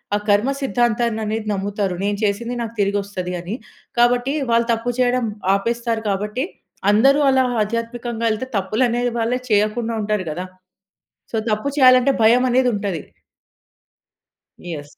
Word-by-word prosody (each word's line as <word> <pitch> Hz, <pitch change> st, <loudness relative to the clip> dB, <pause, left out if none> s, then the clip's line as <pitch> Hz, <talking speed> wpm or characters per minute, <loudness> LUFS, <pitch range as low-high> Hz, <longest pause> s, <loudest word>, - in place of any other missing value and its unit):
ఆ -, -, +3 dB
కర్మ 205 Hz, +5 st, +3 dB
సిద్ధాంతాన్ని 240 Hz, -3 st, 0 dB
అనేది 215 Hz, 0 st, -3 dB
నమ్ముతారు 200 Hz, -1 st, -2 dB
నేను 205 Hz, 0 st, 0 dB
చేసింది 225 Hz, +4 st, -1 dB
నాకు 230 Hz, -1 st, -5 dB
తిరిగి 200 Hz, +1 st, +1 dB
ఒస్తది 185 Hz, -2 st, -5 dB
అని. 180 Hz, +5 st, -5 dB, 0.4 s
కాబట్టి 245 Hz, +3 st, +3 dB, 0.2 s
వాళ్ళు 230 Hz, 0 st, +3 dB
తప్పు 230 Hz, +2 st, -1 dB
చేయడం 250 Hz, -1 st, +2 dB, 0.3 s
ఆపేస్తారు 230 Hz, +2 st, -1 dB
కాబట్టి, 210 Hz, +7 st, -2 dB, 0.5 s
అందరూ 270 Hz, +7 st, +4 dB
అలా 260 Hz, 0 st, +4 dB, 0.2 s
ఆధ్యాత్మికంగా 230 Hz, +1 st, -3 dB
ఎళ్తే 230 Hz, +4 st, -5 dB
తప్పులనే 235 Hz, +5 st, 0 dB, 0.2 s
వాళ్ళే 235 Hz, +2 st, 0 dB
చేయకుండా 215 Hz, +3 st, +1 dB
ఉంటారు 210 Hz, -2 st, -1 dB
గదా! 180 Hz, +4 st, -4 dB, 0.9 s
సో, -, -, 0 dB
తప్పు 215 Hz, +6 st, 0 dB
చేయాలంటే 255 Hz, +1 st, +6 dB
భయం 240 Hz, +3 st, +5 dB
అనేది 250 Hz, 0 st, +3 dB
ఉంటది. 200 Hz, -6 st, -3 dB, 1.6 s
యెస్. 150 Hz, -4 st, -8 dB
225 Hz, 130 wpm, -20 LUFS, 205-245 Hz, 1.6 s, చేయాలంటే